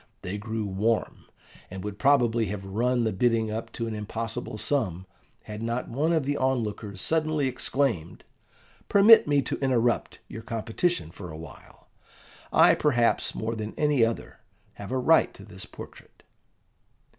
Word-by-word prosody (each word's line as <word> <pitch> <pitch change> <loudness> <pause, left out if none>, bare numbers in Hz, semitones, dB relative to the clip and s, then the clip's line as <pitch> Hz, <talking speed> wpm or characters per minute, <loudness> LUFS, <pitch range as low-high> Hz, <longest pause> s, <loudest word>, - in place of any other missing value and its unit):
They 100 +3 -4
grew 110 0 -3
warm, 105 +4 -1 0.4
and 95 0 -7
would 105 -1 -6
probably 120 -5 +3
have 100 0 -5
run 120 +5 0
the 110 - 0
bidding 115 +1 +1
up 115 +1 -5
to 115 - -3
an 115 - -4
impossible 110 +1 -4
sum, 100 - -1 0.4
had 105 0 -8
not 115 +2 -3
one 150 +7 0
of 160 -5 +1
the 145 +1 -1
onlookers 110 -6 -2
suddenly 155 +2 0
exclaimed, 125 - -1 0.7
"Permit 205 0 +7
me 145 -1 +2
to - - -4
interrupt 125 -3 +1
your 110 - -8
competition 115 - -2
for 90 0 -9
a 80 - -8
while: 80 -1 -13 0.7
I, - - +6
perhaps, 120 -6 +1
more 110 +1 -2
than 110 0 -5
any 150 -5 +3
other, 115 0 -2 0.3
have 100 +2 -9
a 130 - 0
right 160 +5 +4
to 100 - -12
this 95 -3 -9
portrait." - - -13
115 Hz, 155 wpm, -26 LUFS, 105-130 Hz, 0.7 s, Permit